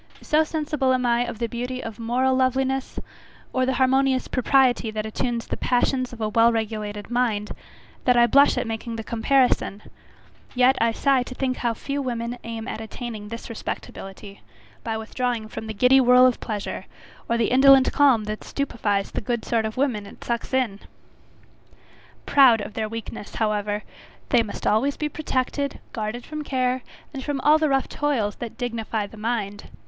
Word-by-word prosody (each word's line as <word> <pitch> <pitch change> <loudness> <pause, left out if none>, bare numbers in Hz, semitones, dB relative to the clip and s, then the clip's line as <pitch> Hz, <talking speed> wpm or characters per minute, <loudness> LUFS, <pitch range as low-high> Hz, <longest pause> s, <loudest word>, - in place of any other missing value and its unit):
so 305 +1 +3
sensible 300 -4 0
am 250 -1 -1
I 240 0 +2
of - - -6
the 235 - -1
beauty 250 +2 -4
of 225 0 -7
moral 250 +3 +1
loveliness, 265 +1 0 0.5
or 255 0 +1
the 265 - +1
harmonious 265 0 +2
propriety 255 -2 +2
that 215 0 -3
attunes 235 +2 -2
the - - -4
passions 255 +1 +1
of 240 - -10
a 215 - 0
well 230 +1 +4
regulated 215 -1 -4
mind, 230 -4 0 0.5
that 250 -1 +4
I 240 - +7
blush 280 +5 +5
at - - 0
making 225 +1 -4
the 225 - -5
comparison; 235 -3 +1 0.7
yet 255 +1 +5
I 230 0 +3
sigh 270 +3 +2
to 255 +1 -7
think 255 -1 -1
how 235 -2 -1
few 280 +4 -3
women 240 -1 -3
aim 230 -1 -6
at 220 - -5
attaining 220 -1 -7
this 230 +2 -7
respectability, 200 -2 -7 0.4
by 225 -1 -2
withdrawing 230 0 -2
from 220 0 -7
the - - -4
giddy 250 +5 +5
whirl 250 0 +6
of 255 -2 +2
pleasure, 210 -2 -5 0.4
or 235 - +2
the 230 - +1
indolent 265 0 +6
calm 270 -6 +4
that 215 0 -5
stupifies 210 -8 -2
the - - -3
good 235 +1 -2
sort 225 -2 +1
of 220 +2 -5
women 240 -7 0
it - - -13
sucks 235 -1 -3
in. 250 -7 0 1.5
Proud 260 -5 +6
of 205 - -6
their 215 -1 -2
weakness, 225 -2 -7
however, 210 -1 -1 0.5
they 245 -4 +5
must 215 -3 -6
always 265 +7 +2
be 300 - -2
protected, 280 -1 -2
guarded 220 +2 -4
from 305 0 -5
care, 255 -2 0 0.3
and 270 -2 -5 0.2
all 305 +1 +6
the 310 -1 +2
rough 270 -1 +1
toils 255 -9 -1
that 235 -2 -7
dignify 225 -4 -2
the 200 - -12
mind. 210 -2 -3
240 Hz, 175 wpm, -24 LUFS, 220-260 Hz, 1.5 s, I